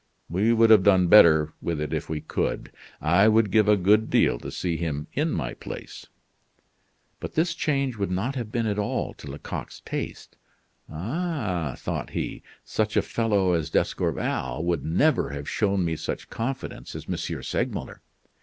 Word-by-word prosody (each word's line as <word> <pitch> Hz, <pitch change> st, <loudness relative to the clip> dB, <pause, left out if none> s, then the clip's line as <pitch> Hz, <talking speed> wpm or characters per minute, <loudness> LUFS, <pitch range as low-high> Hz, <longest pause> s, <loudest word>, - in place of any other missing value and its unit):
We 100 Hz, +6 st, +2 dB
would 115 Hz, -1 st, +5 dB
have 110 Hz, -3 st, +8 dB
done 95 Hz, -3 st, +4 dB
better 80 Hz, -6 st, +7 dB
with 85 Hz, -3 st, -2 dB
it 75 Hz, -, -3 dB
if -, -, -3 dB
we 75 Hz, -1 st, -3 dB
could. 80 Hz, -, -2 dB, 0.3 s
I 90 Hz, +7 st, +4 dB
would 110 Hz, -2 st, +4 dB
give 110 Hz, -1 st, +4 dB
a 105 Hz, 0 st, +5 dB
good 105 Hz, +4 st, +3 dB
deal -, -, +3 dB
to -, -, -7 dB
see 85 Hz, -2 st, -2 dB
him 75 Hz, -3 st, -3 dB
in 150 Hz, +4 st, 0 dB
my 60 Hz, -, -2 dB
place." -, -, -9 dB, 1.1 s
But -, -, -7 dB
this 170 Hz, +2 st, +2 dB
change 140 Hz, -6 st, -1 dB
would 100 Hz, -2 st, -1 dB
not 95 Hz, +9 st, -1 dB
have 120 Hz, -5 st, -5 dB
been 115 Hz, -1 st, 0 dB
at 105 Hz, -1 st, -1 dB
all 105 Hz, -, -2 dB
to 70 Hz, -, -11 dB
Lecoq's 70 Hz, +2 st, -7 dB
taste. -, -, -6 dB, 0.5 s
"Ah," 105 Hz, -, -2 dB
thought -, -, -4 dB
he, -, -, -4 dB, 0.2 s
"such 110 Hz, 0 st, -1 dB
a -, -, +4 dB
fellow 100 Hz, -5 st, +1 dB
as 80 Hz, -2 st, 0 dB
D'Escorval 65 Hz, -1 st, -1 dB
would 85 Hz, -3 st, 0 dB
never 130 Hz, -, +2 dB
have 70 Hz, 0 st, -6 dB
shown 100 Hz, -4 st, +1 dB
me 80 Hz, -1 st, -1 dB
such -, -, -5 dB
confidence 125 Hz, +4 st, -5 dB
as -, -, -7 dB
M. -, -, -1 dB, 0.3 s
Segmuller." -, -, -3 dB
100 Hz, 170 wpm, -25 LUFS, 80-115 Hz, 1.1 s, have